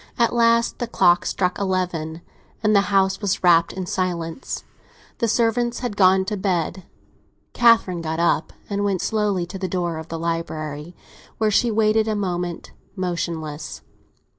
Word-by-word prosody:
At 235 -1 +2
last 230 0 +3
the 240 - -2
clock 175 -6 +3
struck 180 0 -1
eleven, 180 -4 -2 0.4
and 215 0 +3
the 200 0 +3
house 195 -1 +2
was 200 -2 -1
wrapped 170 -1 +5
in 185 -1 -5
silence; 175 +1 -3 0.6
the 230 - +1
servants 235 +2 +1
had 245 -5 -3
gone 190 -1 +4
to 210 - -2
bed. 185 -1 -1 0.7
Catherine 225 -7 +4
got 160 0 -3
up 170 -2 +1 0.2
and 200 0 -2
went 195 -3 0
slowly 210 -5 0
to 185 +2 -8
the 185 - -2
door 175 -3 -2
of 160 - -8
the 165 - -5
library, 160 -1 -4 0.4
where 215 -1 +1
she 235 +4 +3
waited 220 0 +2
a 215 - 0
moment, 180 -4 -3 0.2
motionless. 170 -5 -4
185 Hz, 155 wpm, -22 LUFS, 170-215 Hz, 0.7 s, wrapped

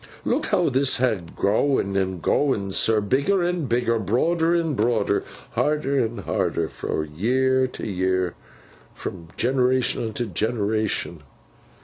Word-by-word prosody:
Look - - 0
how 180 -6 +2
this 135 +1 +2
ha 125 -4 +2 0.2
growen 105 -1 +1
an' 95 -2 -1
growen, 105 - +1
sir, 110 +1 +3
bigger 140 - +1
an' 175 -3 -1
bigger, 120 -1 +1
broader 160 - +1
an' 165 -3 0
broader, 110 -3 +1 0.3
harder 140 -3 +1
an' 115 +1 -4
harder, - - -1
fro 80 - -3
year 130 - +1
to - - -7
year, 95 -2 0 0.6
fro 85 -3 -7
generation 130 0 +2
unto 110 +2 -3
generation. 110 -4 -1
120 Hz, 125 wpm, -23 LUFS, 100-135 Hz, 0.6 s, sir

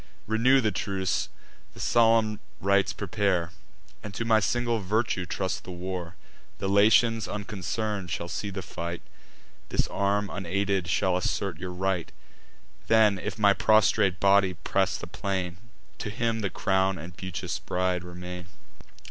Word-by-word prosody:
Renew 120 +5 +4
the 110 -2 +1
truce; 95 +1 -1 0.5
the - - -12
solemn 115 -2 +3 0.2
rites 100 +2 +3
prepare, 95 -4 0 0.5
And 105 -2 -8
to 115 - -2
my 110 -1 +5
single 120 +2 0
virtue 100 -2 0
trust 95 +2 -2
the - - -11
war. 90 -1 -5 0.4
The 95 - -3
Latians 110 +2 +4
unconcern'd 105 -1 -3
shall 85 +1 -3
see 100 +3 -4
the 95 -1 -5
fight; 85 +1 -5 0.7
This - - +1
arm 100 +1 +1
unaided 100 0 -1
shall 90 0 +2
assert 90 -1 -2
your 90 - -5
right: 90 -1 -1 0.8
Then, 110 -3 +5
if - - -4
my 100 -2 +5
prostrate 105 -3 +3
body 100 -1 +4
press - - 0
the - - -7
plain, 95 -3 -3 0.4
To 105 - -3
him 115 +1 -1
the 100 -3 -1
crown 95 0 +1
and 85 +3 -9
beauteous 95 -3 -4
bride 90 -1 -1
remain." 90 0 -8
95 Hz, 140 wpm, -27 LUFS, 90-105 Hz, 0.8 s, my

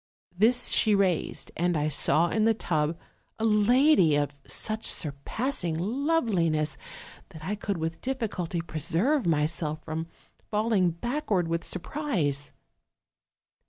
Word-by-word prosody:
This 230 +6 +3
she 215 -2 +4
raised, 175 -8 0
and 175 0 0
I 150 0 0
saw 155 +3 +2
in 215 +5 +1
the 225 0 +3
tub 155 -4 -1 0.4
a 225 - -1
lady 220 - +4
of 145 -1 0
such 220 0 0
surpassing 165 - 0
loveliness 190 - 0 0.5
that 160 -5 -12
I 200 - -2
could 205 -2 -3
with 165 0 -4
difficulty 205 -10 -3
preserve 170 - 0
myself 155 0 0
from 160 +1 -4 0.4
falling 210 -4 +2
backward 200 - -2
with 165 0 -2
surprise. 175 - -2
175 Hz, 120 wpm, -27 LUFS, 160-225 Hz, 0.5 s, she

